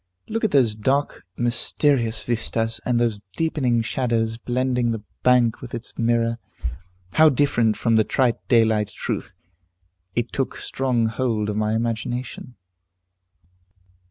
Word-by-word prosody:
Look 225 +1 -3
at 220 - +3
those 130 - +3
dark, 135 +1 -1
mysterious 120 0 +1
vistas, 115 -1 -1
and 120 -1 +2
those 115 -4 0 0.2
deepening 130 -8 +1
shadows 115 -2 0
blending 125 0 0
the 115 -2 -3 0.2
bank 125 -3 +3
with 125 -2 -6
its 120 +1 -7
mirror; 115 0 +1 0.7
how 160 0 +6
different 120 -5 +2
from 115 -2 +2
the 110 - +5
trite 125 +1 0
daylight 110 -3 +3
truth! - - -5 0.8
It 120 0 -1
took 135 - -1
strong 125 -3 0
hold 110 -2 -1
of - - -4
my 110 0 +1
imagination." 120 +2 -3
120 Hz, 130 wpm, -23 LUFS, 115-130 Hz, 0.8 s, how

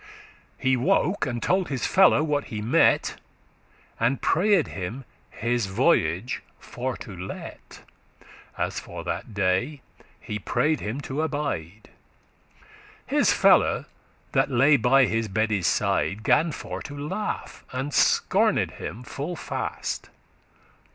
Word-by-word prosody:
He 130 -1 +2
woke, 180 +6 +1
and 120 -2 -3
told 185 0 +1
his 135 -4 -2
follow 190 -5 +5
what 145 -2 0
he 110 - -5
mette, 120 +10 +3 0.8
And 120 +4 +1
prayed 190 -1 +2
him 110 +8 -6 0.2
his 120 -2 -1
voyage 120 - +1 0.2
for 130 0 -5
to 105 -6 -9
let;* 90 +2 -7 0.2
*delay - - -14 0.7
As - - -2
for - - -8
that 110 - -5
day, 100 +9 0 0.4
he 105 - -5
pray'd 135 +9 0
him 115 +7 -4
to 140 +2 -3
abide. 140 - -4 1.1
His - - +3
fellow, - - +4 0.5
that - - +2
lay 135 +3 +5
by 135 +2 +4
his 115 -1 -1
bedde's 105 -2 0
side, 100 +1 0
Gan 150 +8 +3
for - - -6
to 145 - -8
laugh, 185 +9 -4
and 135 +3 -3
scorned - - +3
him 115 +5 -7
full 145 +7 -5
fast. - - -4
130 Hz, 125 wpm, -25 LUFS, 110-150 Hz, 1.1 s, follow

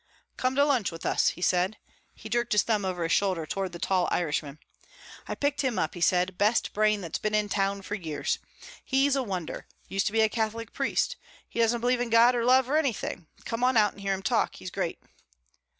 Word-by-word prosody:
"Come 255 +1 -1
to 280 +1 +4
lunch 255 -9 +1
with 165 0 -9
us," - - +2
he 175 - -1
said. 185 +4 +1 0.4
He - - -10
jerked 240 +1 0
his 210 - +4
thumb 210 -4 0
over 180 -2 -2
his 165 - -1
shoulder 185 -5 +1
toward 190 +3 -3
the 170 - -7
tall 185 +1 +1
Irishman. 150 -3 -1 0.7
"I - - -3
picked 285 0 0
him 260 -5 -1
up," 160 - 0
he 175 - -8
said. 180 +1 +2
"Best 215 +3 +2
brain 215 -1 +2
that's 170 -3 -4
been 215 0 -1
in 210 -1 +1
town 195 0 0
for 205 - -6
years. 165 -7 -2 0.4
He's 270 +1 +2
a 270 - +1
wonder. 185 -8 -5 0.2
Used 195 0 0
to - - 0
be 225 +1 +2
a 220 - +5
Catholic 225 0 -3
priest. - - 0 0.3
He - - -6
doesn't 230 +1 +2
believe 245 0 +1
in 245 - -2
God 230 +2 +6
or 240 -1 0
love 255 +1 +4
or 295 +3 +2
anything. 240 - -2 0.2
Come 230 +1 -3
on 255 -1 +3
out 210 -2 +4
and 200 - -13
hear 195 0 0
him 190 - -8
talk. 220 +2 +1
He's 185 - -8
great." 175 -3 -3
210 Hz, 225 wpm, -27 LUFS, 185-240 Hz, 0.7 s, God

